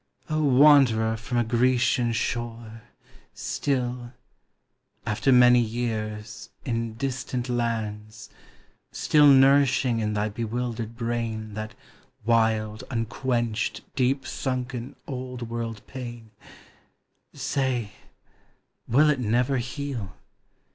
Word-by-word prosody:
O 155 0 +1
wanderer 130 -6 +5
from 110 +2 -4
a 120 - +3
Grecian 120 +1 +2
shore, 115 -1 -4 0.5
Still, 125 -3 -2 0.4
— - - -50 0.3
after 105 +6 +1
many 125 -1 +7
years, 110 -3 -3 0.2
in 115 -2 -2
distant 130 -1 -3
lands, 110 -3 -3 0.3
— - - -30 0.3
Still 150 -1 +4
nourishing 135 -3 +5
in 105 -1 -1
thy 105 0 0
bewildered 115 +1 -4
brain 115 -2 -3
That 110 +1 -6 0.5
wild, 110 -2 +1
unquenched, 120 -1 -1
deep 135 +1 +1
sunken, 130 0 -4
Old 125 -3 -6
world 115 -2 -4
pain, 120 -4 -8 0.6
— - - -47
Say, 130 -6 -1 1.0
will 150 +6 +5
it 140 - -1
never 125 +3 +1
heal? 125 -5 -5
120 Hz, 100 wpm, -25 LUFS, 110-130 Hz, 1.0 s, many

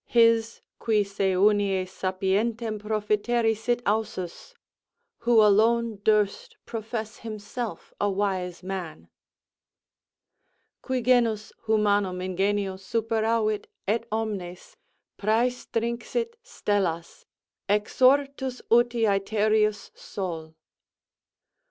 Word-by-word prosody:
His, 230 -1 +3 0.2
qui 215 -3 +2
se 195 -1 -1
unies 195 -1 +2
sapiervtem 210 +4 -1
profiteri 215 +2 +1
sit 240 +3 -1
ausus; 210 - -3 0.6
"who 230 -2 +5
alone 225 +2 +3
durst 220 - +1
profess 220 0 -5
himself 225 +1 -6
a 205 - +2
wise 190 -3 -2
man." 175 - -6 1.7
Qui 255 -2 -2
genus 230 -3 +2
humanum 205 -3 +2
ingenio 190 +1 -1
superavit, 220 +1 0 0.2
et 230 +3 0
omnes 200 -5 -4 0.4
Præstinxit 235 - -1
stellas, 175 -5 -2 0.4
exortus 260 +5 +2
uti 240 0 +4
æthereus 210 +1 +1
Sol. 165 -5 -6
215 Hz, 80 wpm, -26 LUFS, 195-230 Hz, 1.7 s, who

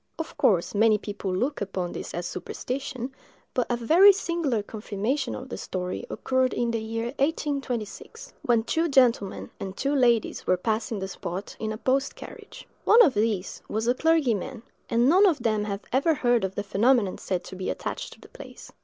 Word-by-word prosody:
Of 325 0 -6
course, 180 -5 +2
many 215 +1 +4
people 205 -2 -5
look 250 +10 -1
upon 190 -3 -3
this - - -6
as 175 0 -3
a - - -3
superstition; 260 0 -5 0.4
but 250 - 0
a 240 - +1
very 335 - +7
singular 335 - -1
confirmation 220 +6 -3
of 260 +1 -8
the - - -6
story 185 +6 -4
occurred 260 -1 0
in 240 -1 0
the 230 -1 -1
year 225 +1 -3
1826, 280 - -3
when 235 -2 +2
two 325 +7 0
gentlemen 245 -8 +2
and 190 0 -6
two 275 +2 0
ladies 240 -5 +2
were 185 - +3
passing 220 +3 -1
the 190 -1 -3
spot 190 +1 -6
in 220 0 -2
a 215 - -4
post 265 +5 0
carriage. - - -11 0.2
One 470 +2 +7
of 285 - +4
these 210 -3 -1
was 220 +2 -1
a 245 - +4
clergyman, 260 - +1 0.3
and 235 +2 +3
none 375 +7 +6
of 300 -10 +1
them 215 -2 +1
had 200 -1 -4
ever 290 +5 +3
heard 240 -4 +2
of 190 0 -2
the 205 - -2
phenomenon 210 0 +2
said 185 -2 -2
to - - -9
be 185 0 -4
attached - - -4
to - - -19
the - - -16
place. - - -12
235 Hz, 190 wpm, -26 LUFS, 205-270 Hz, 0.4 s, very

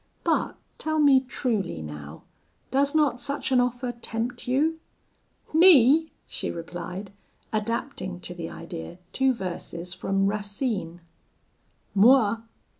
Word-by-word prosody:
But - - +1 0.2
tell 315 0 -1
me 285 -3 +6
truly, 235 - -2
now, 75 0 -9 0.5
does 280 +2 +2
not 295 -5 +3
such 280 +3 -3
an 255 - +5
offer 245 0 0
tempt 235 +1 -4
you?' 305 +6 +1 0.7
'Me!' 320 -2 +7
she - - -4
replied, 180 +3 -6 0.4
adapting 215 -3 -2
to 175 - -5
the 170 -2 -6
idea 170 0 -8 0.2
two 265 0 +3
verses 180 -4 -5
from 195 +1 0
Racine 200 -3 -2 0.9
Moi! 225 +1 +5
230 Hz, 115 wpm, -26 LUFS, 180-265 Hz, 0.9 s, Me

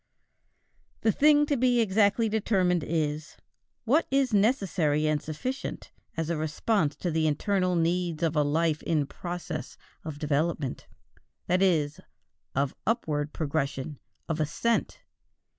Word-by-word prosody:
The 220 - +3
thing 295 +4 +5
to 290 - +1
be 250 -1 +3
exactly 215 +1 +3
determined 190 -6 +1
is: 155 -1 -2 0.5
what 295 +8 +3
is 270 -3 +2
necessary 190 - +2
and 155 -1 +1
sufficient 250 - -5 0.3
as 165 0 -1
a 165 - -1
response 155 +1 0
to 175 - -3
the 160 0 +1
internal 185 +4 +1
needs 170 -1 0
of 165 -1 +1
a 150 - +4
life 155 +1 +1
in 155 -4 +1
process 175 +4 -6 0.3
of 155 -2 -6
development, 150 -1 -1 0.6
that 180 +1 +1
is, 155 -6 +2 0.6
of 140 0 +1
upward 155 -10 0
progression, 145 -2 -2 0.3
of 160 -1 -2
ascent? 155 +10 0
165 Hz, 125 wpm, -28 LUFS, 150-205 Hz, 0.6 s, thing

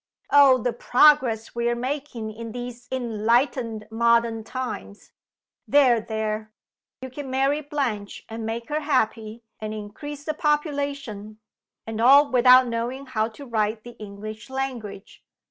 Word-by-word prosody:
Oh, 280 -2 +7
the 245 0 -2
progress 245 -3 +3
we 235 0 0
are 240 - 0
making 250 -3 -4
in 230 0 -8
these 245 0 -7
enlightened 230 -1 0
modern 230 0 +2
times! 250 -4 -6 0.6
There! 255 -5 +4
there! 215 0 -3 0.5
you 260 - -7
can 275 +1 -7
marry 270 +3 +1
Blanche, 260 -9 -3
and 225 0 -6
make 230 +3 -4
her 300 +1 0
happy, 230 -6 -1 0.2
and 215 0 -5
increase 275 +8 -8
the 310 - -2
population 280 - -2 0.5
and 225 0 -4
all 280 +4 +6
without 255 +1 +7
knowing 240 +4 -3
how 220 -4 -1
to 235 +5 -11
write 215 -2 -1
the 240 0 -11
English 215 +2 -8
language. 250 -7 -6
235 Hz, 135 wpm, -24 LUFS, 220-270 Hz, 0.6 s, Oh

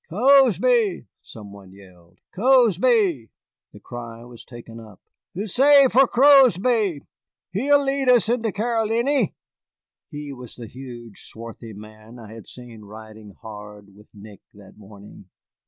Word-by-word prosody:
"Cozby!" 240 - +2 0.2
some 105 -3 -13
one 100 -2 -15
yelled, 90 -3 -20 0.2
"Cozby!" 215 - +1 0.4
The - - -15
cry 120 -1 -10
was 120 -1 -14
taken 115 -2 -13
up. 110 -4 -15 0.4
"Huzzay 265 +8 +3
for 265 +1 +4
Cozby! 240 - +3 0.5
He'll 280 +9 +1
lead 270 -1 -1
us 245 -4 +3
into 230 -2 -1
Caroliny." 230 +5 -1 0.7
He 145 -2 -9
was 125 -3 -12
the 120 - -10
huge, 120 -2 -12
swarthy 115 0 -12
man 110 +3 -15
I 110 -2 -13
had 115 -1 -13
seen 120 -3 -13
riding 110 -1 -14
hard 105 -2 -12
with 105 +1 -20
Nick 100 -1 -15
that 100 -2 -17
morning. 100 -2 -16
125 Hz, 125 wpm, -21 LUFS, -, 0.7 s, for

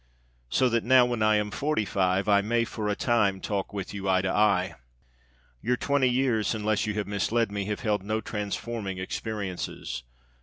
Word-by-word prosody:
So 130 - +3
that 115 -1 +1
now, 130 +1 +6
when 120 -2 -2
I 110 0 +4
am 105 0 0
forty 140 0 0
five, 95 0 +1
I 100 -1 +5
may 115 +3 +1
for 110 -2 -3
a 105 - 0
time 100 -6 +2
talk 100 0 -3
with 100 -1 -5
you 100 -1 -3
eye 95 0 +3
to 95 - 0
eye. 100 -3 +2 0.9
Your 125 0 +1
twenty 140 -1 +2
years, 120 -4 +1
unless 110 0 0
you 105 - -2
have 105 -1 -1
misled 105 +3 0
me, 100 -1 -2
have 105 0 -3
held 105 -3 0
no 110 +3 -1
transforming 105 -1 -4
experiences. 95 - -4
105 Hz, 185 wpm, -27 LUFS, 100-115 Hz, 0.9 s, now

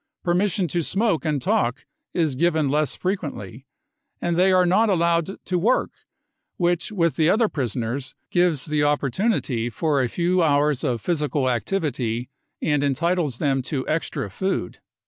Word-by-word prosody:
Permission 180 +1 +1
to 170 +4 0
smoke 195 0 0
and 150 -2 0
talk 120 -1 0 0.3
is 160 -5 0
given 155 0 +1
less 150 +1 +1
frequently; 140 - -4 0.5
and 170 -1 -1
they 185 +2 +4
are 185 -1 +4
not 210 +6 +3
allowed 170 0 +1
to 180 -1 0
work, 230 +9 +2 0.7
which 175 +2 0
with 170 -6 0
the 160 0 +3
other 220 +3 +3
prisoners 130 - -3 0.2
gives 175 -6 +2
the 150 -1 0
opportunity 145 - 0
for 145 +4 0
a 125 - 0
few 180 +4 +1
hours 145 -3 +2
of 125 -6 -1
physical 150 -4 0
activity 125 - -1 0.3
and 145 -2 +1
entitles 150 0 0
them 135 -2 +1
to 130 0 -3
extra 155 - -2
food. 190 - -2
155 Hz, 145 wpm, -23 LUFS, 135-180 Hz, 0.7 s, they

